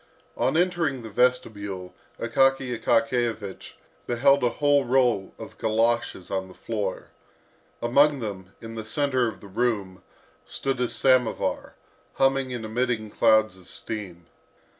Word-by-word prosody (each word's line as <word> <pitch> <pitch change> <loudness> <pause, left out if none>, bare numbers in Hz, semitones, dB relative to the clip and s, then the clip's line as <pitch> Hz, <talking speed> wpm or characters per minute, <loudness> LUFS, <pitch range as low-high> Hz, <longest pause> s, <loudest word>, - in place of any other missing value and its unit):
On - - +1
entering 170 -8 0
the 110 - -8
vestibule, 100 -6 0 0.3
Akaky 135 +1 +2
Akakiyevich 115 -3 -1 0.3
beheld 135 +3 +3
a 120 - +4
whole 145 +3 +2
row 125 -6 +2
of - - -11
goloshes 115 -3 0
on 95 -1 -2
the 95 - -14
floor. 105 -4 -4 0.7
Among 140 +4 +4
them, 100 -4 -6
in 115 0 -8
the 110 -1 -5
centre 130 +1 0
of 110 - -7
the 100 - -11
room, 100 -3 -2 0.4
stood 135 -2 -2
a 125 -1 0
samovar, 130 -3 +1 0.4
humming 135 -1 +2
and 120 -3 -4
emitting 110 -1 -1
clouds 110 -3 +3
of 95 -1 -18
steam. 90 -6 -7
115 Hz, 130 wpm, -25 LUFS, 105-130 Hz, 0.7 s, a